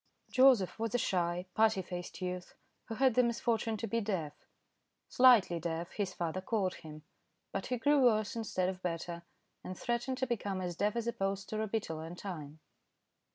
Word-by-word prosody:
Joseph 255 -8 +5
was 225 0 -1
a - - +5
shy, 180 -4 0
putty 220 -3 +3
faced 180 +1 -6
youth, 180 0 -5 0.3
who 225 - -5
had 260 +1 +4
the 250 - +5
misfortune 235 -2 0
to 225 - -3
be 230 +2 -1
deaf. 180 -8 -2 0.8
"Slightly 235 -9 +6
deaf," 165 +1 -3
his 200 -3 -2
father 175 0 -3
called 190 -2 0
him, 155 -2 -11 0.5
but 195 - -3
he 250 - -1
grew 285 +3 +3
worse 220 +1 +2
instead 210 -5 -1
of 185 -1 -4
better, 170 -1 -3 0.4
and 185 - -6
threatened 240 +2 -2
to 260 - 0
become 205 -6 -2
as 180 -2 -3
deaf 205 +5 0
as 235 -1 -1
a 235 - -1
post 195 +1 -3
or 215 - -1
a 220 - -1
beetle 195 -7 -3
in 165 +2 -7
time. 155 -5 -7
195 Hz, 185 wpm, -33 LUFS, 175-230 Hz, 0.8 s, Slightly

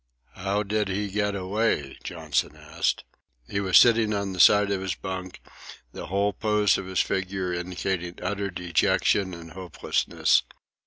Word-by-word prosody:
"How 100 +2 -1
did 105 +1 -1
he 100 +2 -2
get 105 0 0
away?" 95 -7 -1
Johnson 80 -5 -2
asked. - - -2 0.4
He 100 - -2
was 95 -2 +4
sitting 115 -3 +5
on 100 -1 -2
the 90 - -7
side 105 +1 +6
of 95 -1 -1
his 95 -2 -2
bunk, 95 -1 -6 0.5
the - - -8
whole 100 +2 0
pose 105 0 +2
of 95 - -7
his 95 -1 +1
figure 95 -1 -2
indicating 90 0 -3
utter 100 -1 -2
dejection 90 +1 +1
and 85 -1 -11
hopelessness. 90 +1 0
95 Hz, 150 wpm, -26 LUFS, 90-105 Hz, 0.5 s, side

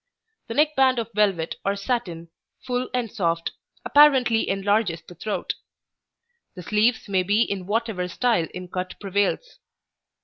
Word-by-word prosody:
The 230 - -5
neck 300 +1 +3
band 260 -1 +4
of 230 -1 -3
velvet 195 -6 +1
or 200 0 0
satin, 200 -7 -3 0.4
full 250 0 -2
and 245 -4 -2
soft, 170 -4 -1 0.3
apparently 265 -6 +5
enlarges 195 -3 0
the - - -13
throat. 200 +5 -3 1.0
The 180 - -8
sleeves 220 +5 +1
may 190 -2 +2
be 205 +5 +2
in 190 -4 -4
whatever 215 -4 -1
style 180 -3 +1
in 180 0 -7
cut 185 0 -5
prevails. 205 - -1
205 Hz, 140 wpm, -24 LUFS, 180-240 Hz, 1.0 s, apparently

